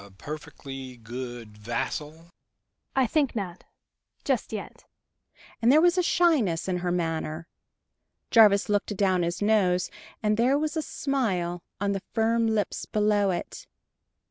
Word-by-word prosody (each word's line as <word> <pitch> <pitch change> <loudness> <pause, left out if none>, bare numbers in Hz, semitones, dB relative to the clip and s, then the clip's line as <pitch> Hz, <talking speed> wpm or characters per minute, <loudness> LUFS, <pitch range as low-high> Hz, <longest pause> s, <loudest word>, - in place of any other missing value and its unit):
perfectly 135 -3 -8
good 120 -1 -7
vassal?" 150 +9 -4 0.7
"I 265 -1 +4
think 280 +1 +1
not 185 -5 -5 0.6
just - - 0
yet," - - -7 0.8
and 235 +2 +5
there 300 - +7
was 350 +2 +4
a 365 - +3
shyness 295 - +2
in 185 -1 0
her 175 0 -2
manner. 165 -1 -2 0.8
Jarvis 210 -3 +6
looked 205 -1 0
adown 190 -3 +2
his 170 +3 -1
nose, 185 -4 +2 0.3
and 210 0 +2
there 255 +4 +3
was 310 +1 -2
a 315 - 0
smile 195 - -1 0.2
on 200 0 0
the 195 -1 -2
firm 230 0 +2
lips 220 -2 -1
below 210 -1 +2
it! 175 -2 -4
195 Hz, 135 wpm, -27 LUFS, 165-230 Hz, 0.8 s, there